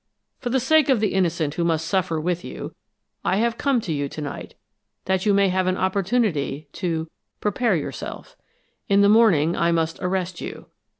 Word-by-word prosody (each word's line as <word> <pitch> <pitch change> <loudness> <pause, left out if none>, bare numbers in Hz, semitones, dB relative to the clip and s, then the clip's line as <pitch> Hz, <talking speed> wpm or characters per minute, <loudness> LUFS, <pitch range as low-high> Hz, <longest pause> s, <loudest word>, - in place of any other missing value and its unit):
For 245 - -3
the 260 +2 +2
sake 295 +3 +3
of 260 -4 +4
the 215 -2 0
innocent 165 -6 0
who 170 - -1
must 165 -1 0
suffer 185 -4 0
with 175 +2 -2
you, - - -7 0.5
I - - +1
have 230 +2 0
come 275 -3 +2
to 170 - -3
you 145 -1 -2
to - - -8
night, 145 -2 -6 0.5
that 190 +2 0
you 205 - +5
may 200 -1 +4
have 185 0 0
an 185 0 +1
opportunity 190 - 0
to 165 -4 -2 0.3
prepare 210 0 +1
yourself. 155 - -6 0.5
In 200 0 +5
the 200 - +5
morning 185 -8 +4
I 170 0 +2
must 165 -1 0
arrest 180 -1 -2
you. - - -7
185 Hz, 185 wpm, -23 LUFS, 165-210 Hz, 0.5 s, you